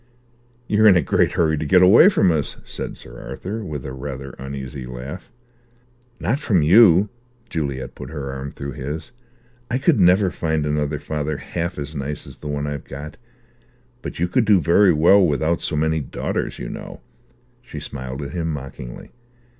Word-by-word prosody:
"You're 110 +1 +4
in 95 -4 +7
a 85 - +2
great - - +2
hurry 80 -3 +2
to - - -2
get 90 +3 +6
away 110 - +8
from 95 - +3
us," 75 -3 -1
said - - -6
Sir - - -12
Arthur, 110 +4 -5
with 75 -8 -6
a 65 - -5
rather 70 0 -6
uneasy 65 -1 -6
laugh. 65 - -8 0.9
"Not 130 +6 0
from 100 - +2
you." 95 +2 +6 0.4
Juliet 70 -5 -3
put 65 - -9
her 70 -3 -5
arm 70 +1 -5
through 70 0 -6
his. 75 +5 -6 0.6
"I 125 - +1
could 135 -1 +3
never 90 +1 +5
find 80 -2 -1
another 75 0 -1
father 75 0 -3
half 85 +4 -4
as 75 +1 -5
nice 70 +1 -4
as - - -12
the 75 - -9
one 75 0 -2
I've 75 -1 -4
got. 70 +2 -8 0.8
But - - -6
you 85 - +1
could 110 +6 +2
do 105 -3 +5
very 90 +3 +5
well 85 +5 +5
without 80 +1 +1
so 80 - -2
many 80 +1 +1
daughters, 70 - -3
you - - -6
know." - - -8 0.6
She - - -8
smiled 65 +1 -6
at 70 - -6
him 80 -2 -2
mockingly. 70 -4 -8
75 Hz, 180 wpm, -22 LUFS, 70-90 Hz, 0.9 s, away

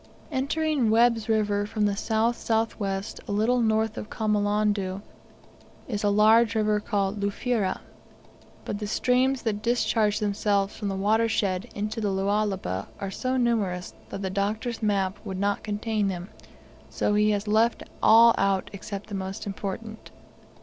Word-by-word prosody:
Entering 280 -2 0
Webb's 230 0 +3
River 205 -2 +1
from 210 0 0
the 205 -1 +1
south 220 +3 +1
south 225 0 -1
west, 195 0 -3
a - - -4
little 225 +5 +2
north 220 -1 +1
of 210 - -8
Kamolondo, 205 -2 0 0.8
is 210 -4 -3
a 205 - +3
large 220 +2 +5
river 215 -1 +2
called 205 -1 -1
Lufira, 200 0 -1 0.8
but 205 - -4
the 210 - -4
streams, 255 +4 +1
that 210 -3 -1
discharge 225 -2 +1
themselves 200 -1 0
from 210 - -4
the 195 - -2
watershed 205 -1 +1
into 215 +2 -3
the 205 - 0
Lualaba 195 - -1
are 195 -1 -4
so 255 +5 -1
numerous 210 -7 0 0.2
that 195 - -6
the 190 - -2
Doctor's 215 +5 -2
map 200 -2 0
would 190 -3 -5
not 200 0 0
contain 210 0 -1
them, 180 0 -4 0.6
so 210 - 0
he 210 +1 +3
has 205 0 -1
left 220 +3 +2 0.2
all 230 +1 +7
out 195 -1 +1
except 200 0 -6
the 210 - -11
most 190 0 -4
important. 205 +2 -6
210 Hz, 150 wpm, -26 LUFS, 200-225 Hz, 0.8 s, all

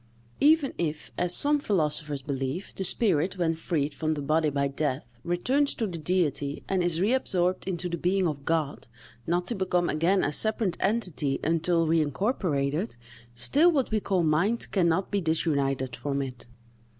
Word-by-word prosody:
Even 300 -1 +4
if, 155 -3 -3
as 180 0 +3
some 295 +1 +3
philosophers 150 - -1
believe, 135 +5 -4
the 190 - -2
spirit, 185 -2 +1
when 170 -2 +1
freed 155 -3 -2
from 155 +3 -1
the 145 - -4
body 155 +2 +2
by 140 -1 0
death, 135 -4 -3
returns 255 +12 +1
to 225 - -1
the 175 -5 -5
Deity 150 -5 -1
and 190 -1 0
is 170 -2 0
reabsorbed 185 -5 +1
in 185 -2 -1
the 175 0 -3
being 180 +2 +1
of 145 -3 -4
God, 155 -2 -1 0.4
not 175 +1 0
to 240 - +2
become 180 -4 0
again 175 +5 +2
a 145 - 0
separate 215 +1 +1
entity 185 -10 -1
until 165 +1 +1
reincorporated, 160 - 0 0.4
still 290 - +3
what 275 -8 0
we 215 - +2
call 190 -3 0
mind 170 +9 +1
can 185 -4 +2
not 180 +4 0
be 200 -1 0
disunited 140 -6 0
from 140 -1 -2
it. 125 -3 -9
170 Hz, 165 wpm, -27 LUFS, 145-190 Hz, 0.4 s, Even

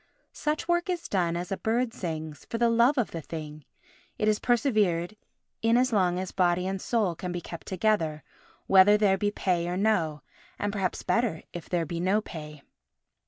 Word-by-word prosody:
Such 300 +1 -2
work 345 +1 +1
is 350 -2 -2
done 170 -3 0
as 175 +2 -5
a 195 - -1
bird 230 +1 0
sings—for 160 +3 -5
the 235 0 +3
love 235 +5 +4
of 245 - 0
the 165 - -5
thing; 155 -2 -8 0.5
it 215 - 0
is 215 -1 +3
persevered 215 -8 +1 0.5
in 225 +1 +4
as 250 0 +2
long 180 -4 +2
as 185 0 -4
body 180 -1 +2
and 190 0 -3
soul 215 -7 +1
can 180 +2 -5
be 175 - -3
kept 170 -1 -9
together, 180 -6 0 0.4
whether 195 +2 +6
there 200 -2 +3
be 205 - +1
pay 180 -4 0
or 180 +1 -2
no, 165 -9 +1 0.3
and 205 0 -2
perhaps 190 -3 -2
better 230 -9 0
if 175 - -8
there 175 -2 0
be 170 +2 -4
no 190 +4 +2
pay. 150 -7 -9
190 Hz, 185 wpm, -27 LUFS, 170-220 Hz, 0.5 s, whether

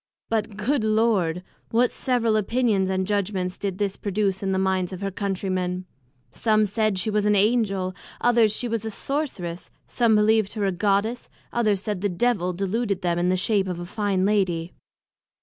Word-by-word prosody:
But, 215 -2 -1
good 240 +4 0
Lord! 215 -6 +1 0.3
what 240 +2 +3
several 235 -4 +1
Opinions 215 -3 +1
and 190 0 0
Judgments 190 -2 -1
did 195 -2 -3
this 200 -1 -1
produce 200 -1 -1
in 195 -1 -1
the 190 - +1
minds 190 -1 0
of 185 0 -7
her 195 0 -2
Country 195 0 -3
men! 180 0 -2 0.5
some 215 -2 +2
said 215 0 0
she 200 +4 -1
was 210 0 +1
an 210 0 +4
Angel; 200 -3 +1 0.3
others, 235 -3 +4
she 240 +3 -1
was 230 -2 -2
a 220 - -3
sorceress; 215 - -3 0.2
some 230 -3 +2
believed 215 -1 +3
her 210 -3 -1
a 195 - +2
Goddess; 205 +5 0 0.2
others 210 -5 +1
said 205 -4 -3
the 205 - +1
Devil 180 -1 +1
deluded 200 +2 -2
them 175 -1 +1
in 175 +1 +1
the 185 - +2
shape 195 0 +1
of 180 -2 -4
a 175 - -5
fine 195 -1 0
Lady. 180 -5 0
200 Hz, 185 wpm, -24 LUFS, 185-220 Hz, 0.5 s, an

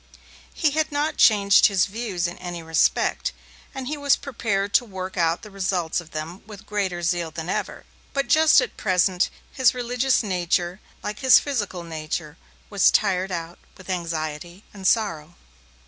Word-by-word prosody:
He 310 -3 +2
had 315 +1 0
not 295 +2 -1
changed 200 -3 +6
his 195 -3 +2
views 200 -4 -3
in 175 - -8
any 175 -2 -6
respect, 160 -1 +1 0.4
and 265 -1 -5
he 300 +4 -3
was 285 -1 +3
prepared 205 -7 -2
to - - +5
work 190 -4 -7
out 170 -1 +1
the 210 - -11
results 185 -4 -1
of 165 - -16
them 160 +3 -6
with 210 -1 -11
greater 190 -5 -2
zeal 170 -1 0
than 160 +1 -6
ever, - - -3 0.3
but 275 0 -1
just 315 0 +6
at - - -5
present 185 -1 +2 0.2
his 260 -2 +3
religious 250 +1 +1
nature, 180 -1 -1 0.2
like 210 +4 -5
his 260 -2 +7
physical 205 -10 -2
nature, 155 -1 -5 0.3
was 200 -3 +4
tired 190 -2 +1
out 170 -1 -5 0.2
with 185 -1 -7
anxiety 170 +1 -4
and 195 -2 -3
sorrow. 175 -8 0
190 Hz, 160 wpm, -23 LUFS, 175-225 Hz, 0.4 s, his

